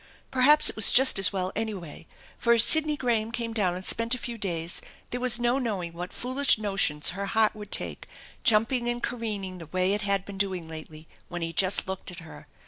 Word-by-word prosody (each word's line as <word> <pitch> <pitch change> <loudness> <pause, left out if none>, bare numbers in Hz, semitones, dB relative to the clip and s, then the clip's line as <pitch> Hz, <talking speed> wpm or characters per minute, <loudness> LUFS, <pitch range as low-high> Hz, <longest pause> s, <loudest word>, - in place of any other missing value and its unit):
Perhaps 295 +4 +5
it - - +4
was 215 - +5
just 260 -5 +5
as 195 - +6
well, 185 -1 -3
any 220 -1 -2
way, 165 -3 -11 0.3
for 235 - +2
if 230 - +4
Sidney 305 +2 +6
Graham 230 -4 -1
came 230 -1 -4
down 190 -5 0
and 185 +1 -8
spent 230 +2 +1
a - - -7
few 240 0 -6
days 170 -5 -3 0.3
there 245 - -4
was 250 -2 +4
no 240 +2 0
knowing 195 -9 -4
what 175 +2 -7
foolish 255 +2 +1
notions 195 -8 0
her 200 +2 -5
heart 220 +1 +2
would 210 -1 -11
take, - - -2 0.4
jumping 235 +2 +2
and 240 0 -4
careening 205 -6 -5
the 165 - -10
way 185 +4 0
it 210 - -1
had 200 -2 -1
been 200 -1 -9
doing 185 -4 -2
lately 155 0 -10 0.2
when 175 -1 -6
he 165 0 -4
just 185 +3 +1
looked 190 0 -6
at 180 0 -10
her. 160 - -13
205 Hz, 220 wpm, -26 LUFS, 185-240 Hz, 0.4 s, as